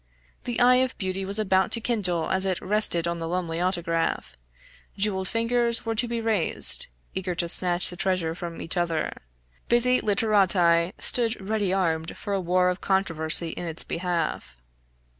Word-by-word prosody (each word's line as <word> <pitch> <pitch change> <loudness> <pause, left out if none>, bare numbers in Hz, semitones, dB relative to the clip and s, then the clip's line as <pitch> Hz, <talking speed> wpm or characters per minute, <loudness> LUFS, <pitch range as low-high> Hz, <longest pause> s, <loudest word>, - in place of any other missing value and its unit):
The 240 -1 -3
eye 250 +1 +5
of 255 0 -1
beauty 190 0 -3
was 200 +2 +1
about 190 -3 +1
to 230 - +3
kindle 190 -8 -2
as 190 0 +3
it 190 -2 -1
rested 185 -4 +2
on 170 0 -3
the 165 - -4
Lumley 170 -1 -3
autograph; 170 - -1 0.6
jeweled 195 -2 0
fingers 235 +1 +1
were 225 - -1
to 235 +2 0
be 235 0 -3
raised, 220 -6 +2 0.3
eager 185 -1 -4
to 170 - -2
snatch 175 +1 +5
the - - -8
treasure 185 -3 -1
from 170 -1 -8
each 165 - -6
other; 165 -3 -2 0.5
busy 250 +1 +4
literati 190 -5 +2
stood 235 -2 0
ready 210 -3 -1
armed 165 -4 -2
for 205 - -5
a 195 - -1
war 180 +1 +1
of 180 0 -4
controversy 170 -4 -1
in 175 - -6
its 165 0 -2
behalf. 170 - -4
185 Hz, 165 wpm, -25 LUFS, 170-215 Hz, 0.6 s, eye